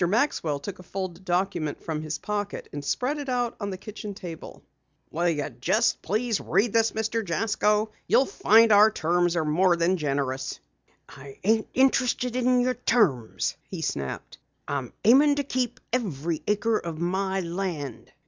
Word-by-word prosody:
Maxwell 195 - +1
took 185 +7 -7
a - - -9
folded 185 -1 -5
document 175 -4 -1
from 155 -2 -3
his 155 0 -4
pocket 205 -1 -4
and 145 0 -5
spread 255 - -1
it 280 -2 -5
out 245 -2 0
on 205 -2 -3
the 190 - -5
kitchen 210 0 -8
table. 170 -4 -9 0.5
"Will 175 +2 +1
you 150 -3 -1
just 170 - +1
read 215 -1 +1
this, 225 0 +4
please, - - -16
Mr. 225 +1 -1
Jasko? 210 +3 +1 0.2
You'll 270 - +4
find 225 -1 +4
our 210 +1 +7
terms 175 -2 +1
are 160 -2 0
more 175 +4 +3
than 170 +2 +1
generous." 135 -3 -2 0.5
"I 135 0 -12
ain't 220 +2 +2
interested 250 -2 +2
in 250 0 +3
your 255 +1 +1
terms," 170 - +1
he 175 -4 -5
snapped. 70 - -4 0.3
"I'm 135 -4 -3
aimin' 285 +6 +6
to 285 - -1
keep 255 -3 -2
every 170 - -1
acre 215 +2 +1
of 165 -2 -6
my 190 +3 -1
land." 170 - -4
195 Hz, 160 wpm, -26 LUFS, 160-225 Hz, 0.5 s, our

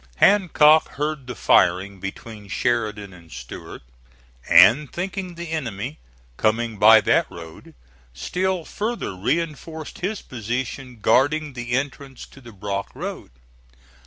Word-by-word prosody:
Hancock 160 - +5
heard 150 -2 -3
the 125 - -6
firing 95 +1 +2
between 105 +2 -8
Sheridan 105 -4 -2
and 85 -2 -16
Stuart, - - -9 0.7
and 140 +6 +6
thinking 185 0 -5
the 170 -1 -7
enemy 125 -3 -4 0.4
coming 110 0 0
by 110 +1 +8
that - - +2
road, 80 -2 -12 0.4
still 180 - -2
further 220 - -4
reinforced 155 - -3
his 200 +4 -3
position 125 +1 -5
guarding 150 +4 +2
the 120 -1 -5
entrance 135 0 -4
to 135 - -17
the 120 -2 -12
Brock 100 -1 -4
Road. - - -6
125 Hz, 120 wpm, -22 LUFS, 105-155 Hz, 0.7 s, by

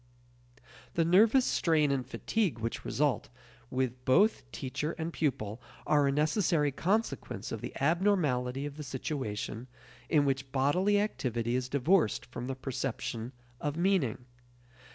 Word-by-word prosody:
The 165 - +3
nervous 220 +9 +5
strain 155 -4 +2
and 135 -2 0
fatigue 170 - -1
which 115 0 -4
result - - 0 0.4
with 130 -1 -2
both 135 - +3
teacher 150 +6 -3
and 165 0 -4
pupil 115 -7 -2 0.2
are 145 -2 +3
a - - +3
necessary 150 0 +2
consequence 200 - -1
of - - -4
the - - -5
abnormality 145 -6 +1
of 145 0 -7
the 150 - -5
situation 130 -4 -4 0.4
in 150 -3 +4
which 135 -1 -1
bodily 180 +10 +2
activity 120 - -1
is 125 0 -1
divorced 140 - +2
from 120 0 -6
the 135 - -3
perception 125 -3 -4 0.3
of 145 +1 -2
meaning. 170 - +1
140 Hz, 135 wpm, -31 LUFS, 125-170 Hz, 0.4 s, nervous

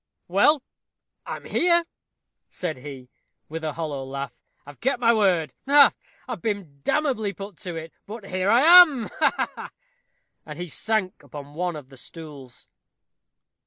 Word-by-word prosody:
"Well, 250 - +4 0.6
I - - -3
am - - -12
here," 345 -1 +2 0.6
said 165 -6 -4
he, 130 -1 -10 0.4
with 160 +1 -6
a 155 -1 -2
hollow 150 -4 -4
laugh. 135 -1 -6 0.3
"I've 145 0 -13
kept 265 +1 0
my 235 -1 +4
word 180 - +2
ha, 285 0 +7
ha! - - -35 0.3
I've - - -5
been 195 -11 -4
damnably 240 - 0
put 195 -2 -9
to 175 -2 -7
it; 165 0 -7
but 215 0 -8
here 185 0 -1
I 235 +4 +5 0.2
am, 280 -10 +2
ha, - - +2
ha!" - - -9 0.7
And 150 -1 -9
he 175 0 -6
sank 215 +2 -1
upon 145 -1 -10
one 175 +1 -2
of 145 -4 -10
the 135 - -15
stools. 145 -3 -11
175 Hz, 160 wpm, -24 LUFS, 145-220 Hz, 0.7 s, ha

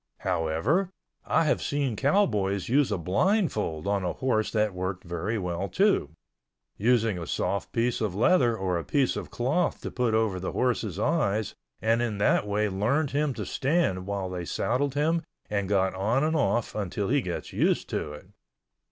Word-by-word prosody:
However, 100 - 0 0.4
I - - +3
have 155 - +1
seen 140 -5 -1
cowboys 105 - +1
use 135 0 +3
a 105 - +1
blindfold 105 - 0
on 100 -1 0
a 90 - -1
horse 115 -5 0
that 105 -2 +1
worked 95 0 -4
very 90 +6 -3
well, 90 0 -3
too—using 100 - -1
a 85 - -6
soft 100 - -2
piece 120 0 0
of 105 -5 -1
leather 120 - +3
or 90 -3 -1
a - - -5
piece 140 -3 +1
of - - -5
cloth 145 +9 0
to - - -5
put 120 -3 0
over 110 -4 +1
the 95 - -4
horse's 115 -7 0
eyes 110 - 0 0.3
and 115 +2 +3
in 115 -4 -1
that 100 0 +2
way 105 +1 +1
learned 120 +10 0
him 145 -2 0
to - - -4
stand 135 - 0
while 100 -2 -2
they 90 -1 -4
saddled 130 +10 -1
him 160 +3 +2 0.3
and 100 -2 -1
got 95 -2 +2
on 110 +8 +1
and 160 +1 +1
off 120 -6 +1
until 100 0 -2
he 140 +2 +3
gets 90 -6 -5
used - - +1
to 75 - -3
it. 75 - -11
110 Hz, 175 wpm, -27 LUFS, 95-135 Hz, 0.4 s, I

